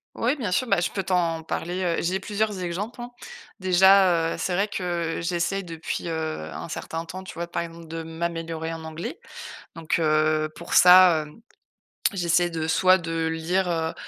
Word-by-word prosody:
Oui, 250 Hz, +6 st, 0 dB
bien 220 Hz, -10 st, -3 dB
sûr, 255 Hz, +8 st, +1 dB
bah, 230 Hz, -, +2 dB
je 175 Hz, -, -1 dB
peux 195 Hz, -, -3 dB
t'en 170 Hz, -3 st, 0 dB
parler, 175 Hz, +3 st, -3 dB
heu, 170 Hz, -2 st, 0 dB
j'ai 185 Hz, +3 st, -1 dB
plusieurs 210 Hz, -1 st, -2 dB
exemples, 205 Hz, +8 st, -4 dB
hein. 240 Hz, 0 st, -7 dB, 0.5 s
Déjà, 185 Hz, -2 st, +5 dB
heu, -, -, -5 dB
c'est 185 Hz, -, -2 dB
vrai 200 Hz, +4 st, +1 dB
que 175 Hz, -4 st, -2 dB
j'essaie 175 Hz, +3 st, -1 dB
depuis, 165 Hz, -2 st, -5 dB
heu, 160 Hz, -, -3 dB
un -, -, -7 dB
certain 165 Hz, +1 st, -5 dB
temps, 185 Hz, +3 st, -8 dB
tu -, -, -8 dB
vois, 170 Hz, +1 st, -5 dB
par 170 Hz, -, -3 dB
exemple, 165 Hz, -1 st, -10 dB
de 165 Hz, +1 st, -5 dB
m'améliorer 165 Hz, 0 st, -4 dB
en 165 Hz, 0 st, -8 dB
anglais, 160 Hz, +1 st, -6 dB, 0.6 s
donc, 165 Hz, 0 st, -1 dB
heu, 155 Hz, -1 st, +2 dB
pour 170 Hz, -, -9 dB
ça, 180 Hz, -3 st, +7 dB
hem, 150 Hz, +9 st, -16 dB, 0.7 s
j'essaie 175 Hz, -2 st, +1 dB
de 160 Hz, -1 st, -3 dB
soit 185 Hz, +3 st, +5 dB
de 165 Hz, -2 st, -2 dB
lire, 175 Hz, +3 st, -1 dB
heu, 160 Hz, -1 st, -1 dB
170 Hz, 185 wpm, -25 LUFS, 165-185 Hz, 0.7 s, ça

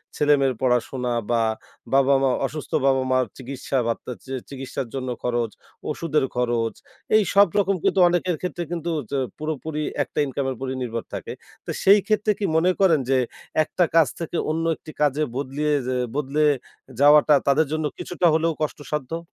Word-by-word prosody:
ছেলে-মেয়ের 140 Hz, -3 st, +3 dB
পড়াশোনা 125 Hz, 0 st, 0 dB, 0.2 s
বা 115 Hz, -1 st, +3 dB, 0.5 s
বাবা-মা 135 Hz, 0 st, +4 dB, 0.2 s
অসুস্থ 150 Hz, +2 st, -6 dB
বাবা-মার 130 Hz, -1 st, +2 dB
চিকিৎসা 135 Hz, +1 st, -4 dB
বার্তা 115 Hz, +2 st, -3 dB
চি 135 Hz, -, -11 dB, 0.2 s
চিকিৎসার 135 Hz, -2 st, -5 dB
জন্য 130 Hz, -1 st, -3 dB
খরচ, 120 Hz, -2 st, 0 dB, 0.4 s
ওষুধের 155 Hz, -4 st, 0 dB
খরচ 120 Hz, -2 st, 0 dB, 0.4 s
এই 215 Hz, -, +6 dB
সব 200 Hz, -1 st, +7 dB
রকম 195 Hz, -1 st, +2 dB
কিন্তু 195 Hz, -, +2 dB
অনেকের 175 Hz, 0 st, 0 dB
ক্ষেত্রে 180 Hz, -1 st, -3 dB
কিন্তু 170 Hz, -1 st, -4 dB
তো -, -, 0 dB
হচ্ছে 140 Hz, +1 st, -4 dB, 0.2 s
পুরোপুরি 155 Hz, 0 st, -3 dB, 0.2 s
একটা -, -, -5 dB
ইনকাম 135 Hz, 0 st, -3 dB
এর -, -, -2 dB
উপর 135 Hz, -, -5 dB, 0.2 s
নির্ভর 115 Hz, -1 st, -4 dB
থাকে। -, -, -5 dB, 0.3 s
তো -, -, -9 dB
সেই 200 Hz, +2 st, +7 dB
ক্ষেত্রে 215 Hz, 0 st, +2 dB
কি 200 Hz, -, 0 dB
মনে 180 Hz, +3 st, +4 dB
করেন 170 Hz, -6 st, +4 dB
যে 135 Hz, -, +4 dB, 0.5 s
একটা 175 Hz, -, 0 dB
কাজ 160 Hz, -4 st, +6 dB
থেকে 165 Hz, 0 st, -3 dB
অন্য 165 Hz, +1 st, -1 dB
একটি 155 Hz, -, -12 dB
কাজে 150 Hz, +1 st, +2 dB
বদলিয়ে 145 Hz, +2 st, -1 dB
যে 130 Hz, -, 0 dB, 0.2 s
বদলে 150 Hz, +1 st, 0 dB, 0.6 s
যাওয়াটা 150 Hz, +1 st, +6 dB
তাদের 145 Hz, +3 st, +3 dB
জন্য 155 Hz, -1 st, -1 dB
কিছুটা 180 Hz, 0 st, 0 dB
হলেও 160 Hz, +1 st, +2 dB
কষ্টসাধ্য? 150 Hz, +1 st, -3 dB
145 Hz, 160 wpm, -23 LUFS, 130-165 Hz, 0.6 s, সব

